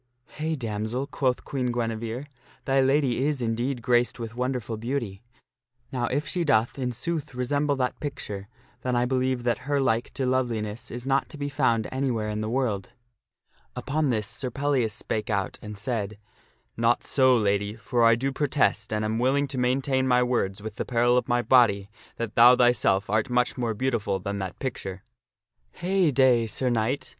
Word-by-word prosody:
" 125 - -48
Hey, 160 +1 -1
damsel! 115 +1 -3
" - - -33
quoth 130 -2 +1
Queen 125 -3 -1
Guinevere, 115 +2 -3 0.2
" - - -29
thy 135 0 +3
lady 135 -2 +2
is, 150 -3 -1
indeed, 120 +2 -2
graced 120 0 +2
with 115 -1 -5
wonderful 125 -2 -2
beauty. 115 -4 -3 0.7
Now 125 -2 -1
if 145 +5 -1
she 175 +3 -1
doth 120 -4 +2
in 125 -1 -1
sooth 155 +2 -3
resemble 145 +3 0
that 125 -2 -2
picture, 105 -9 -5 0.3
then 125 -1 -1
I 120 0 +2
believe 130 -1 0
that 125 +3 -1
her 145 -1 +2
like 120 -3 +1
to 135 - -1
loveliness 120 -4 -1
is 120 +1 -6
not 135 0 +1
to 155 - -9
be 145 0 -3
found 115 -5 +1
anywhere 125 -5 -1
in 105 0 -3
the 110 - -2
world." 115 -6 -1 0.9
Upon 150 +1 -1
this 110 -4 0
Sir 130 +5 -4
Pellias 135 -3 0
spake 110 +2 -4
out 100 -2 -1
and 105 -2 -8
said, 105 -2 -3 0.3
" - - -40
Not 115 +1 +2
so, 130 -2 +4
Lady; 100 -1 0
for 115 +2 0
I 115 0 +6
do 135 +4 -1
pro 145 +2 -1
test, 110 -6 +1
and 110 0 0
am 110 +1 -1
willing 140 +3 +2
to 130 -1 -3
maintain 130 +1 +1
my 125 -1 +4
words 105 -5 -1
with 110 -1 -7
the - - -1
peril 120 0 +2
of 125 - +1
my 120 0 +2
body, 105 -6 +4 0.2
that 115 -2 -4
thou 120 +2 +8
thyself 115 -6 +3
art 110 +5 0
much 125 0 +1
more 115 -3 -2
beautiful 115 -5 0
than 100 +1 -4
that 95 -2 -5
picture." 95 -7 -5 0.4
" - - -66 0.3
Hey 185 -1 +1
day, 125 -4 +4
Sir 125 +3 -1
Knight 115 +4 0
120 Hz, 190 wpm, -26 LUFS, 110-130 Hz, 0.9 s, thou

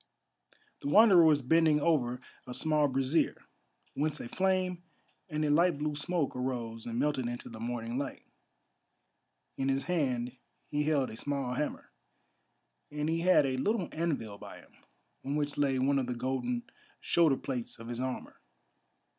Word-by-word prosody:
The - - -5
Wanderer 200 -1 +7
was 150 -3 +4
bending 160 +2 +4
over 130 -6 +1 0.3
a 125 - -5
small 150 +2 +2
brazier, 135 +4 +1 0.6
whence 150 +1 -1
a - - -6
flame 185 +2 0 0.5
and 155 -1 -1
a 145 - +2
light 170 +1 +4
blue 150 +1 -1
smoke 155 +1 -1
arose 120 -3 -3
and 115 0 -3
melted 135 -2 0
into 120 0 -5
the 110 - -9
morning 120 +1 -3
light. 140 -1 -5 1.3
In 135 0 0
his 135 0 +1
hand 130 -8 -1 0.3
he 150 - -1
held 145 -4 +1
a - - -8
small 140 0 -2
hammer, 150 +4 -3 1.0
and 150 +1 -2
he 165 +1 +1
had 175 -4 +5
a 130 -1 -1
little 200 - 0
anvil 140 -11 -2
by - - -10
him, - - -22 0.5
on 140 +2 -2
which 145 -1 -1
lay 140 -2 +1
one 135 +2 +2
of 130 - -2
the 125 - -2
golden 135 - -2 0.4
shoulder 160 -6 +3
plates 125 -4 -4
of 115 0 -10
his 120 0 -5
armour. 130 0 -5
140 Hz, 160 wpm, -31 LUFS, 125-160 Hz, 1.3 s, Wanderer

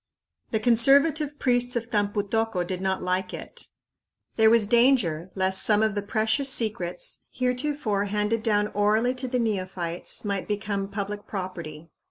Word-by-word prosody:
The 220 - 0
conservative 280 +6 +3
priests 245 -1 +1
of 235 0 -3
Tampu 205 -1 0
tocco 225 -3 -1
did 185 0 -4
not 190 0 -1
like 185 0 -1
it. - - -11 0.7
There 220 -1 +5
was 230 -2 +5
danger 215 - +2
lest 190 0 +2
some 215 0 +4
of 220 -1 +1
the 205 - -2
precious 220 +6 0
secrets, 215 -8 -1
heretofore 250 -5 -1
handed 210 +2 -1
down 210 -2 +1
orally 215 +4 +1
to 255 0 -4
the 250 0 -1
neophytes, 185 -6 -2
might 200 -2 -2
become 205 -1 -3
public 205 0 -5
property. 170 -5 -7
210 Hz, 150 wpm, -25 LUFS, 190-235 Hz, 0.7 s, There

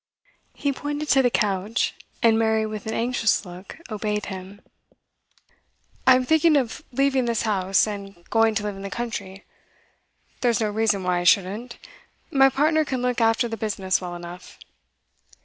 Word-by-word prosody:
He 285 -1 -1
pointed 290 +2 -4
to 270 - +5
the 250 - +3
couch, 210 0 0 0.3
and 225 -1 +5
Mary, 220 -1 +2
with 215 0 -6
an 220 - -2
anxious 230 -3 +1
look, 180 +2 -10
obeyed 210 0 -2
him. 190 +2 -9 1.5
'I'm 255 -1 +6
thinking 315 +1 +4
of 260 +2 -2
leaving 270 0 +1
this 235 -2 0
house, 195 -3 +2
and 200 -4 -8
going 225 -1 +3
to 210 - -1
live 205 -1 -3
in 195 - -9
the 195 - -5
country. 200 -4 -5 0.9
There's 240 -4 +2
no 215 -2 0
reason 210 -2 +1
why 180 -1 +1
I - - -3
shouldn't. 200 +6 +1 0.5
My 270 -1 +6
partner 310 +3 +2
can 260 -4 -3
look 250 -1 0
after 225 +2 +3
the 225 -1 -5
business 195 -4 -1
well 175 -1 -5
enough. 175 +1 -10
220 Hz, 160 wpm, -24 LUFS, 195-250 Hz, 1.5 s, I'm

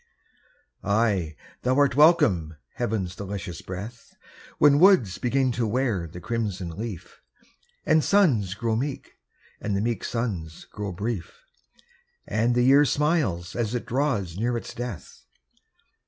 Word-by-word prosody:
Ay, 100 -7 +1 0.3
thou 130 +1 +1
art 140 -3 +3
welcome, 100 - +4 0.2
heaven's 105 -7 -2
delicious 95 -4 -6
breath, 105 +6 -8 0.4
When 145 -1 +5
woods 175 - +5
begin 130 +1 +1
to 115 -1 -1
wear 110 -7 -1
the 85 +2 -10
crimson 100 -3 -3
leaf, 105 0 -7 0.6
And 155 -1 +4
suns 125 - +2
grow 115 +1 -1
meek, 135 +4 -4 0.4
and 100 -2 -1
the - - 0
meek 115 +1 -2
suns 95 -10 -4
grow 105 -1 -6
brief, 100 -1 -5 0.8
And 115 +3 +1
the 120 - +3
year 135 +3 +6
smiles 140 - 0
as 120 0 -1
it 120 - -3
draws 110 - -1
near 120 +1 0
its - - -7
death. 120 -8 -8
115 Hz, 130 wpm, -25 LUFS, 95-130 Hz, 0.8 s, year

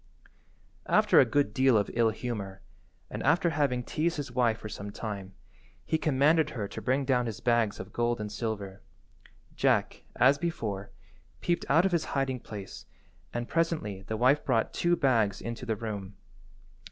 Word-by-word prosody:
After - - +5
a - - +7
good 140 -3 +1
deal 130 -1 +4
of 100 - 0
ill–humour, 110 -4 -1 0.5
and - - -4
after 170 +5 +3
having 140 -5 0
teased 165 +6 -1
his 145 -4 -4
wife 120 -3 +2
for 110 - -8
some 100 -1 -7
time, 100 -3 -6 0.5
he 160 - 0
commanded 150 +2 +3
her 110 -8 -4
to - - -7
bring 135 +2 +1
down 125 -2 +2
his 110 - -5
bags 115 -3 +1
of 95 - -8
gold 120 0 0
and 105 -1 -4
silver. 105 -3 -4 0.7
Jack, - - +1
as 135 +4 +4
before, 110 - -3 0.5
peeped 175 0 -1
out 165 +6 +5
of 195 - +2
his 170 -2 +1
hiding 135 -2 0
place, 100 -4 -9 0.4
and 120 0 -3
presently 155 - -1
the 110 +3 -4
wife 130 +5 +3
brought 115 -4 +1
two 175 0 +2
bags 115 - +2
into 115 +2 -6
the 110 - 0
room. 105 -3 -6
120 Hz, 165 wpm, -29 LUFS, 105-145 Hz, 0.7 s, a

